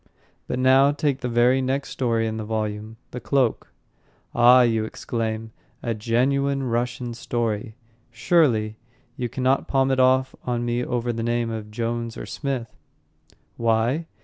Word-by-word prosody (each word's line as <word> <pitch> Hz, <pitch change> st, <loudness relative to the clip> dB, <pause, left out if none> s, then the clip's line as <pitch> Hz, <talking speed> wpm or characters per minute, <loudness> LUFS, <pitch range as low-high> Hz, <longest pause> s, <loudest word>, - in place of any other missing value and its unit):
But, -, -, -2 dB
now, 130 Hz, +2 st, +5 dB
take 145 Hz, -2 st, -1 dB
the 125 Hz, -, -3 dB
very 120 Hz, +3 st, +3 dB
next 135 Hz, +1 st, -1 dB
story 115 Hz, -3 st, 0 dB
in 110 Hz, 0 st, -3 dB
the 110 Hz, -, -4 dB
volume, 110 Hz, 0 st, -4 dB
The 125 Hz, -, -5 dB
Cloak. 120 Hz, +1 st, 0 dB, 0.6 s
"Ah," 125 Hz, +1 st, +7 dB
you 115 Hz, -2 st, +2 dB
exclaim, 110 Hz, 0 st, -4 dB, 0.3 s
"a 115 Hz, -, -1 dB
genuine 135 Hz, +5 st, +1 dB
Russian 120 Hz, 0 st, -2 dB
story, 115 Hz, -2 st, -3 dB, 0.3 s
Surely. 115 Hz, -4 st, +2 dB, 0.4 s
You 125 Hz, -3 st, -3 dB
cannot 130 Hz, +2 st, 0 dB
palm 135 Hz, -1 st, +2 dB
it 130 Hz, -, +1 dB
off 130 Hz, 0 st, +3 dB
on 120 Hz, -1 st, -2 dB
me 120 Hz, +1 st, 0 dB
over 120 Hz, -1 st, -1 dB
the 115 Hz, -, -3 dB
name 120 Hz, 0 st, 0 dB
of 110 Hz, -1 st, -5 dB
Jones 115 Hz, +1 st, -3 dB
or -, -, -6 dB
Smith." 130 Hz, -6 st, -4 dB, 0.8 s
Why? 115 Hz, +7 st, +1 dB
120 Hz, 150 wpm, -24 LUFS, 115-130 Hz, 0.8 s, Ah